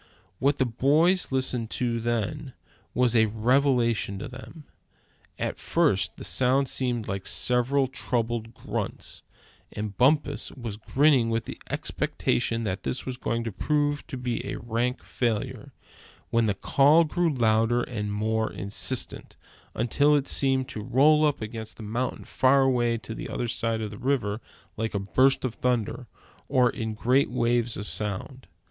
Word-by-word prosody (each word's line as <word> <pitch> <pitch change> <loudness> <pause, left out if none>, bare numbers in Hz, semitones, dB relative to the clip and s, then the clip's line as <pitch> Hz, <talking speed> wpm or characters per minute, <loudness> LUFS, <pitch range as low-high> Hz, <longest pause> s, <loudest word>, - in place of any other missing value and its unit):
What 140 +2 +2
the 130 - +2
boys 150 +10 +2
listened 130 -3 -1
to 120 -2 0
then, 120 +5 -2 0.4
was 125 -1 +2
a 110 -1 +5
revelation 120 -2 +2
to 100 - -6
them. 130 +4 -11 0.7
At - - -3
first, 100 - +1
the - - -8
sound 130 +2 +2
seemed 120 -4 -1
like 95 -2 -4
several 130 +3 +2
troubled 115 -2 -2
grunts, - - -5 0.5
and 105 -1 -5
Bumpus 145 +4 +2
was 115 -6 -6
grinning 130 +1 +3
with 115 0 -1
the - - -8
expectation 115 -1 -1
that 95 -2 -3
it 125 - -3
was 130 - -4
going 115 -2 -2
to 115 - -3
prove 145 +7 0
to 145 -5 -6
be 125 -1 -2
a - - -4
rank 120 +2 -2
failure, 115 -4 -2 0.6
when 115 -1 +3
the 100 - +1
call 145 - +4
grew 170 +1 0
louder 115 -1 +2
and 105 -4 -4
more 110 +2 0
insistent, 100 +2 -4 0.4
until 145 +6 +3
it 145 -1 0
seemed 135 -1 +1
to 110 -5 -5
roll 150 +8 +4
up 145 -6 -2
against 110 0 -7
the 110 - -8
mountain 120 +4 -3
far 135 +1 +3
away 120 -3 +2
on 110 - -5
the - - -6
other 120 - -2
side 115 -1 -1
of 105 -2 -4
the 105 - -9
river 120 -5 0 0.4
like 110 -1 -2
a - - +1
burst 130 +8 +2
of 125 - -2
thunder; 125 0 -1 0.4
or 125 -2 +4
in 110 -1 -4
great 125 +5 +2
waves 120 -1 0
of 105 - -5
sound. 105 +6 -5
120 Hz, 155 wpm, -26 LUFS, 110-135 Hz, 0.7 s, a